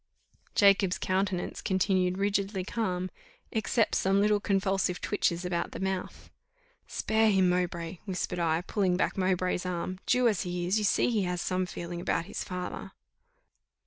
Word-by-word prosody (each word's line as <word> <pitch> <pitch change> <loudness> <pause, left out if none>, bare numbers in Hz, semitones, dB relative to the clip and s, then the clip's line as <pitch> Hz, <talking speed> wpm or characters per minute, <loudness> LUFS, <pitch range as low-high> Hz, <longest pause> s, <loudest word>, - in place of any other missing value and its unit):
Jacob's 195 -2 +4
countenance 185 -1 -1
continued 185 -2 +1
rigidly 200 -1 0
calm, 185 -3 -2 0.4
except 225 0 +1
some 195 +1 +2
little 210 0 +3
convulsive 195 -2 0
twitches 180 -3 0
about 175 -1 -2
the - - -6
mouth. 190 -1 -4 0.6
"Spare 220 0 +2
him, 190 -3 +4
Mowbray," 175 -1 -1
whispered 185 -2 -3
I, 165 -1 +1
pulling 185 -1 0
back - - 0
Mowbray's 185 -1 0
arm; 180 0 -3
"Jew 250 -1 +4
as 215 -5 +1
he 175 -1 -3
is, 190 +5 +2
you - - -2
see 225 - +3
he 220 -3 +1
has 180 0 -2
some 185 +1 -1
feeling 175 0 -6
about 170 - 0
his - - -5
father." 180 -1 -6
185 Hz, 150 wpm, -29 LUFS, 180-200 Hz, 0.6 s, Jacob's